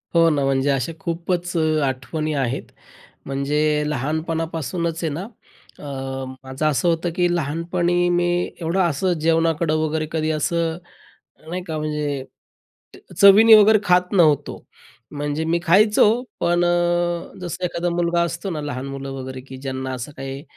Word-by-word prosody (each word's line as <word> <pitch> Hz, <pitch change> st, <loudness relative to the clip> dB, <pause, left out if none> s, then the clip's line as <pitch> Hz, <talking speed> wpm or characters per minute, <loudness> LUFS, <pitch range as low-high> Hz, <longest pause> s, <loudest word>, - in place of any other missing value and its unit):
हो 165 Hz, 0 st, +6 dB
ना, 145 Hz, -2 st, +1 dB
म्हणजे 135 Hz, +1 st, +1 dB
अशा 135 Hz, +3 st, -1 dB
खूपच 175 Hz, +1 st, -3 dB, 0.3 s
आठवणी 150 Hz, +4 st, -3 dB
आहेत. 135 Hz, -2 st, -2 dB, 0.5 s
म्हणजे 140 Hz, +2 st, -1 dB, 0.3 s
लहानपणापासूनच 160 Hz, +3 st, -2 dB
आहे 160 Hz, -, 0 dB
ना, 165 Hz, -, -4 dB, 0.6 s
अ, 135 Hz, -2 st, -5 dB, 0.2 s
माझं 130 Hz, +3 st, -4 dB
असं 145 Hz, +2 st, 0 dB
होतं, 170 Hz, +1 st, +1 dB
की 180 Hz, -2 st, +2 dB
लहानपणी 175 Hz, +3 st, 0 dB
मी 175 Hz, 0 st, +2 dB, 0.4 s
एवढं 165 Hz, +4 st, -1 dB
असं 175 Hz, +1 st, +1 dB
जेवणाकडं 165 Hz, -1 st, +2 dB
वगैरे 155 Hz, 0 st, -1 dB
कधी 160 Hz, -1 st, 0 dB
असं, 165 Hz, +2 st, -1 dB, 0.7 s
नाही 180 Hz, +2 st, -4 dB
का 160 Hz, -1 st, -3 dB
म्हणजे 150 Hz, -3 st, -2 dB, 0.7 s
ट -, -, -16 dB
चवीने 215 Hz, +3 st, +9 dB
वगैरे 215 Hz, +1 st, +6 dB
खात 180 Hz, -1 st, +2 dB
नव्हतो. 155 Hz, -7 st, +2 dB, 0.5 s
म्हणजे 145 Hz, +1 st, -3 dB
मी 170 Hz, +1 st, +1 dB
खायचो, 205 Hz, +5 st, +5 dB, 0.3 s
पण 175 Hz, 0 st, +2 dB
अ, 175 Hz, 0 st, 0 dB
जसं 175 Hz, 0 st, -5 dB
एखादा 175 Hz, 0 st, -2 dB
मुलगा 170 Hz, 0 st, +1 dB
असतो 170 Hz, +3 st, -4 dB
ना, 155 Hz, -4 st, -4 dB
लहान 135 Hz, -3 st, -4 dB
मुलं 135 Hz, 0 st, -6 dB
वगैरे, 130 Hz, -1 st, -7 dB
की 130 Hz, 0 st, -11 dB
ज्यांना 130 Hz, 0 st, -4 dB
असं 125 Hz, +3 st, -6 dB
काही 135 Hz, +1 st, -6 dB
160 Hz, 145 wpm, -21 LUFS, 140-175 Hz, 0.7 s, चवीने